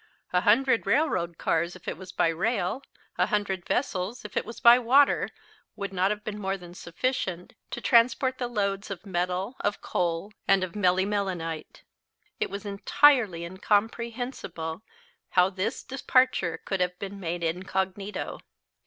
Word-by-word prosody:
A 180 Hz, -, +4 dB
hundred 235 Hz, +4 st, +3 dB
railroad 180 Hz, -, +1 dB
cars, 170 Hz, +2 st, 0 dB
if 185 Hz, -, -15 dB
it -, -, -2 dB
was 185 Hz, +1 st, -10 dB
by 165 Hz, -, +2 dB
rail, 200 Hz, +5 st, -1 dB, 0.4 s
a -, -, +4 dB
hundred 195 Hz, -4 st, -1 dB
vessels, 210 Hz, -1 st, -1 dB
if 210 Hz, -, -9 dB
it -, -, 0 dB
was 230 Hz, -, -8 dB
by 240 Hz, +1 st, +8 dB
water, 265 Hz, +4 st, +4 dB, 0.5 s
would 200 Hz, -1 st, -5 dB
not 185 Hz, +1 st, +2 dB
have 210 Hz, 0 st, -3 dB
been 210 Hz, -1 st, -5 dB
more 195 Hz, 0 st, -1 dB
than 175 Hz, -2 st, -12 dB
sufficient 180 Hz, 0 st, -3 dB, 0.2 s
to 240 Hz, -, -5 dB
transport 250 Hz, +3 st, +3 dB
the 245 Hz, -, -1 dB
loads 200 Hz, -3 st, -1 dB
of 190 Hz, -1 st, -7 dB
metal 185 Hz, +5 st, -2 dB
of 205 Hz, -, -1 dB
coal, 175 Hz, +3 st, -1 dB
and 195 Hz, -1 st, +4 dB
of 185 Hz, -, -3 dB
melimelonite. 185 Hz, -4 st, -1 dB, 0.6 s
It -, -, 0 dB
was 200 Hz, +1 st, -6 dB
entirely 205 Hz, -, +3 dB
incomprehensible 210 Hz, -3 st, -2 dB, 0.5 s
how 180 Hz, +1 st, +4 dB
this 200 Hz, +6 st, -3 dB
departure 255 Hz, -10 st, +1 dB
could 195 Hz, -, -1 dB
have 180 Hz, 0 st, 0 dB
been 200 Hz, +1 st, -6 dB
made 170 Hz, -1 st, -3 dB
incognito. 190 Hz, +4 st, -2 dB
195 Hz, 150 wpm, -27 LUFS, 180-230 Hz, 0.6 s, by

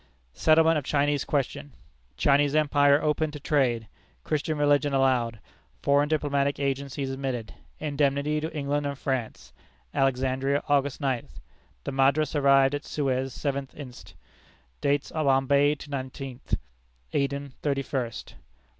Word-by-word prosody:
Settlement 160 Hz, 0 st, +4 dB
of -, -, -8 dB
Chinese 145 Hz, 0 st, +1 dB
question. 145 Hz, -1 st, -2 dB, 0.4 s
Chinese 145 Hz, +1 st, +3 dB
empire 145 Hz, -1 st, +4 dB
opened 150 Hz, 0 st, 0 dB
to 150 Hz, -, -7 dB
trade; 125 Hz, -7 st, +1 dB, 0.4 s
Christian 155 Hz, +1 st, -1 dB
religion 145 Hz, -1 st, +2 dB
allowed; 125 Hz, -4 st, +2 dB, 0.5 s
foreign 145 Hz, +1 st, +3 dB
diplomatic 140 Hz, -2 st, 0 dB
agents 140 Hz, 0 st, -2 dB
admitted; 135 Hz, -4 st, -3 dB, 0.3 s
indemnity 145 Hz, 0 st, 0 dB
to 160 Hz, +1 st, -4 dB
England 145 Hz, -1 st, -1 dB
and 140 Hz, -1 st, -4 dB
France. 115 Hz, -, -4 dB, 0.4 s
Alexandria, 135 Hz, +1 st, +1 dB
August 145 Hz, 0 st, +1 dB
ninth. 130 Hz, -4 st, -2 dB, 0.4 s
The -, -, -4 dB
Madras 140 Hz, +3 st, +2 dB
arrived 135 Hz, -1 st, +4 dB
at 145 Hz, -, -3 dB
Suez 135 Hz, -2 st, -1 dB
seventh 140 Hz, 0 st, -3 dB
inst. 130 Hz, -4 st, -11 dB, 0.7 s
Dates 140 Hz, 0 st, 0 dB
Bombay 140 Hz, -1 st, +3 dB
to 150 Hz, -, -11 dB
the -, -, -1 dB
nineteenth; 130 Hz, -1 st, -4 dB, 0.6 s
Aden, 140 Hz, 0 st, -1 dB
thirty 140 Hz, -2 st, 0 dB
first. 120 Hz, -5 st, -4 dB
140 Hz, 125 wpm, -27 LUFS, 135-145 Hz, 0.7 s, Settlement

